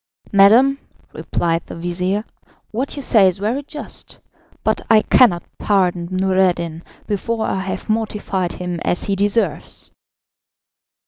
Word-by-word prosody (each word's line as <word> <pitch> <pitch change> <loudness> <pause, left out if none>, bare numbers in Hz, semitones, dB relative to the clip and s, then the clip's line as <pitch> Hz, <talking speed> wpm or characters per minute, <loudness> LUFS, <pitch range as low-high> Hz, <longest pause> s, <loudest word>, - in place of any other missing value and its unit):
"Madam," 230 +8 +6 0.3
replied 165 0 -1
the - - -8
vizir, 180 +5 -2 0.5
"what 255 +6 -3
you 285 - -5
say 210 -6 +5
is 185 0 0
very 220 +8 -1
just, 295 +1 -8 0.4
but - - +1
I 220 -1 +6
cannot 185 -9 +4 0.2
pardon 180 -4 +1
Noureddin 185 -3 +1 0.2
before 220 +2 -2
I 190 - -1
have 190 0 -5
mortified 210 -5 -1
him 180 -1 -4
as 175 - 0
he 200 - -1
deserves." 200 -4 -1
195 Hz, 125 wpm, -19 LUFS, 180-220 Hz, 0.5 s, Madam